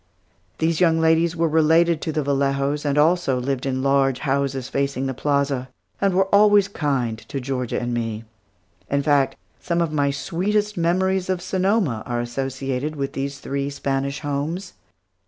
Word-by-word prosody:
These 160 Hz, +1 st, 0 dB
young 165 Hz, -2 st, +4 dB
ladies 160 Hz, +1 st, +3 dB
were 165 Hz, 0 st, +1 dB
related 160 Hz, +1 st, +3 dB
to 160 Hz, -, -2 dB
the 155 Hz, -1 st, -1 dB
Vallejos 140 Hz, +1 st, 0 dB
and 145 Hz, 0 st, 0 dB
also 150 Hz, -4 st, +3 dB
lived 135 Hz, +1 st, -2 dB
in 130 Hz, 0 st, -1 dB
large 135 Hz, -1 st, +2 dB
houses 135 Hz, -2 st, -1 dB
facing 140 Hz, -1 st, -1 dB
the 135 Hz, -, -2 dB
plaza, 140 Hz, -1 st, 0 dB, 0.3 s
and 195 Hz, -2 st, +2 dB
were 190 Hz, +1 st, +4 dB
always 205 Hz, -1 st, +6 dB
kind 135 Hz, -, -1 dB
to 140 Hz, -, -6 dB
Georgia 125 Hz, -2 st, -2 dB
and 120 Hz, 0 st, -3 dB
me. 115 Hz, -2 st, -3 dB, 0.7 s
In 140 Hz, 0 st, +1 dB
fact, 140 Hz, -2 st, +2 dB, 0.2 s
some 170 Hz, -1 st, -1 dB
of 165 Hz, -2 st, 0 dB
my 145 Hz, -2 st, +2 dB
sweetest 195 Hz, +9 st, -1 dB
memories 185 Hz, +2 st, +1 dB
of 185 Hz, -1 st, 0 dB
Sonoma 185 Hz, -, 0 dB
are 120 Hz, -1 st, -1 dB
associated 135 Hz, +3 st, -3 dB
with 140 Hz, -1 st, -3 dB
these 140 Hz, +1 st, -3 dB
three 140 Hz, 0 st, -3 dB
Spanish 140 Hz, 0 st, -2 dB
homes. 155 Hz, +6 st, -3 dB
140 Hz, 160 wpm, -22 LUFS, 135-170 Hz, 0.7 s, always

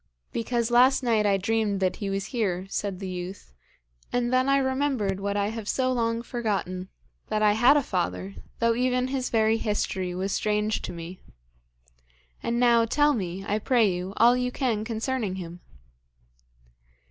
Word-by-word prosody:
'Because 235 Hz, 0 st, -1 dB
last 255 Hz, +3 st, +5 dB
night 220 Hz, -4 st, +2 dB
I 200 Hz, -1 st, +3 dB
dreamed 205 Hz, 0 st, 0 dB
that 185 Hz, -1 st, 0 dB
he 200 Hz, -3 st, -3 dB
was 195 Hz, 0 st, -2 dB
here,' 190 Hz, -6 st, -1 dB
said 200 Hz, -2 st, -2 dB
the 195 Hz, -, -5 dB
youth, 180 Hz, -, -7 dB, 0.6 s
'and 245 Hz, 0 st, 0 dB
then 255 Hz, +1 st, +3 dB
I 275 Hz, -, +4 dB
remembered 260 Hz, -7 st, 0 dB
what 200 Hz, +1 st, -2 dB
I 200 Hz, 0 st, +1 dB
have 220 Hz, -2 st, -5 dB
so 255 Hz, -1 st, +1 dB
long 230 Hz, -1 st, -1 dB
forgotten, 200 Hz, -6 st, -3 dB, 0.4 s
that 215 Hz, 0 st, 0 dB
I 210 Hz, -, +5 dB
had 240 Hz, +7 st, +5 dB
a 290 Hz, -, +1 dB
father, 190 Hz, -1 st, -2 dB, 0.2 s
though 230 Hz, 0 st, +2 dB
even 250 Hz, +1 st, 0 dB
his 260 Hz, -1 st, -2 dB
very 220 Hz, 0 st, +2 dB
history 190 Hz, -4 st, -2 dB
was 190 Hz, +2 st, -2 dB
strange 210 Hz, +1 st, 0 dB
to -, -, -5 dB
me. 170 Hz, +2 st, -8 dB, 1.2 s
And 235 Hz, +1 st, -1 dB
now, 235 Hz, -1 st, +5 dB
tell 290 Hz, +5 st, +3 dB
me, 190 Hz, -4 st, -4 dB
I 210 Hz, +1 st, 0 dB
pray 225 Hz, -4 st, +3 dB
you, 180 Hz, +2 st, -5 dB
all 235 Hz, +2 st, +6 dB
you 250 Hz, 0 st, -1 dB
can 240 Hz, -5 st, -1 dB
concerning 225 Hz, -2 st, -2 dB
him.' 175 Hz, -2 st, -7 dB
220 Hz, 170 wpm, -26 LUFS, 195-245 Hz, 1.2 s, all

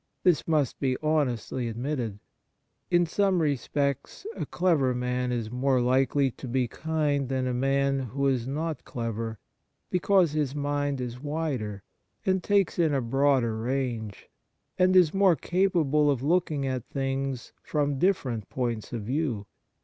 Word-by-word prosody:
This 175 Hz, -5 st, +3 dB
must 150 Hz, -6 st, +1 dB
be 130 Hz, -2 st, 0 dB
honestly 130 Hz, -5 st, 0 dB
ad 115 Hz, -, -6 dB
mitted. 120 Hz, -5 st, -2 dB, 0.7 s
In 175 Hz, -1 st, +4 dB
some 190 Hz, +2 st, +2 dB
respects 140 Hz, -, -1 dB
a -, -, -4 dB
clever 155 Hz, -9 st, +2 dB
man 125 Hz, 0 st, -1 dB
is 115 Hz, -3 st, -2 dB
more 130 Hz, +1 st, +2 dB
likely 130 Hz, +2 st, +2 dB
to 130 Hz, -, -9 dB
be 125 Hz, 0 st, 0 dB
kind 145 Hz, -1 st, -1 dB
than 130 Hz, -1 st, 0 dB
a 125 Hz, -, -1 dB
man 135 Hz, +2 st, +1 dB
who 135 Hz, +2 st, -2 dB
is 130 Hz, -3 st, +1 dB
not 155 Hz, +2 st, -3 dB
clever, 115 Hz, -1 st, -4 dB, 0.5 s
because 180 Hz, -2 st, +3 dB
his 150 Hz, -3 st, -1 dB
mind 145 Hz, -1 st, -1 dB
is 125 Hz, -1 st, -5 dB
wider, 140 Hz, -10 st, -3 dB, 0.4 s
and 190 Hz, -1 st, +2 dB
takes 200 Hz, -2 st, +1 dB
in 160 Hz, -4 st, +3 dB
a -, -, +2 dB
broader 130 Hz, -1 st, +2 dB
range, 115 Hz, -3 st, -3 dB, 0.5 s
and 185 Hz, 0 st, +3 dB
is 175 Hz, -4 st, +6 dB
more 195 Hz, -3 st, +5 dB
capable 160 Hz, -3 st, +2 dB
of 135 Hz, -3 st, 0 dB
looking 155 Hz, -3 st, +1 dB
at 130 Hz, -3 st, -3 dB
things 135 Hz, -1 st, -3 dB
from 145 Hz, -2 st, -1 dB
different 130 Hz, -, 0 dB
points 120 Hz, -4 st, -3 dB
of 115 Hz, -3 st, -4 dB
view. 125 Hz, -3 st, -1 dB
135 Hz, 150 wpm, -27 LUFS, 125-155 Hz, 0.7 s, is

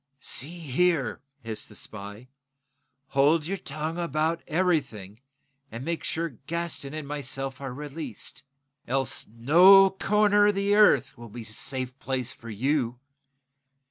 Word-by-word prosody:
"See 150 Hz, +7 st, -4 dB
here," 165 Hz, -2 st, 0 dB, 0.2 s
hissed 110 Hz, -1 st, -5 dB
the -, -, -14 dB
spy, 105 Hz, +3 st, -8 dB, 0.8 s
"hold 145 Hz, +3 st, +3 dB
your 195 Hz, +3 st, -3 dB
tongue 155 Hz, +4 st, -3 dB
about 160 Hz, 0 st, 0 dB
everything, 140 Hz, -, -1 dB, 0.5 s
and 115 Hz, +4 st, -6 dB
make 170 Hz, 0 st, -2 dB
sure 165 Hz, +1 st, -2 dB, 0.2 s
Gaston 155 Hz, -4 st, -3 dB
and 155 Hz, -2 st, -5 dB
myself 135 Hz, -2 st, -4 dB
are 135 Hz, -2 st, -4 dB
released. 145 Hz, -2 st, -5 dB, 0.5 s
Else, 135 Hz, 0 st, -1 dB
no 180 Hz, -, +7 dB
corner 205 Hz, +1 st, +3 dB
of 205 Hz, -, +2 dB
the 200 Hz, +1 st, +1 dB
earth 210 Hz, 0 st, +5 dB
will 120 Hz, -1 st, -10 dB
be 115 Hz, +2 st, -8 dB
a -, -, -15 dB
safe 130 Hz, +4 st, -5 dB
place 130 Hz, -2 st, -3 dB
for 115 Hz, -, -12 dB
you. 125 Hz, +2 st, -1 dB
145 Hz, 135 wpm, -27 LUFS, 125-170 Hz, 0.8 s, no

